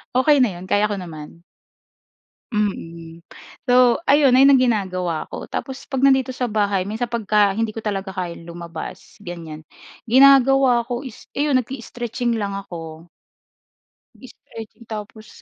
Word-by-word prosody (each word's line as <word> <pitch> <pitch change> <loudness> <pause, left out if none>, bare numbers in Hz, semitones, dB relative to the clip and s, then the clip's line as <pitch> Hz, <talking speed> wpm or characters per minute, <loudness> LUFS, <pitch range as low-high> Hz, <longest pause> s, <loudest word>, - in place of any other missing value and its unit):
Okey 280 +2 +4
na 250 - +4
yun, 180 - -9
kaya 205 +2 +1
ko 205 - -2
naman. 165 -2 -10 1.1
Mm. 170 -6 -4 0.5
So, 250 +1 +5
ayun. 280 -2 +5
Ayun 270 +2 +7
ang 275 - +7
ginagawa 185 -9 -1
ko. - - -7
Tapos 265 0 -6
'pag 270 -2 -3
nandito 265 -1 +3
sa 250 -1 -2
bahay 205 -2 0
minsan 215 +6 -3
pagka 210 -4 +1
hindi 225 +2 -1
ko 215 - -10
talaga 195 -2 -3
kayang 175 -3 -6
lumabas, 170 +2 -9
ganyan. 165 -4 -8 0.5
Ginagawa 270 -1 +6
ko 245 +3 -4
is 255 - -11
iyon 285 -3 +2
nag-i-stretching 240 -1 -4
lang 200 -1 -3
ako. 165 -3 -9 1.1
Nag-stretching 230 -2 -13
tapos 215 0 -9
215 Hz, 135 wpm, -21 LUFS, 185-255 Hz, 1.1 s, Ayun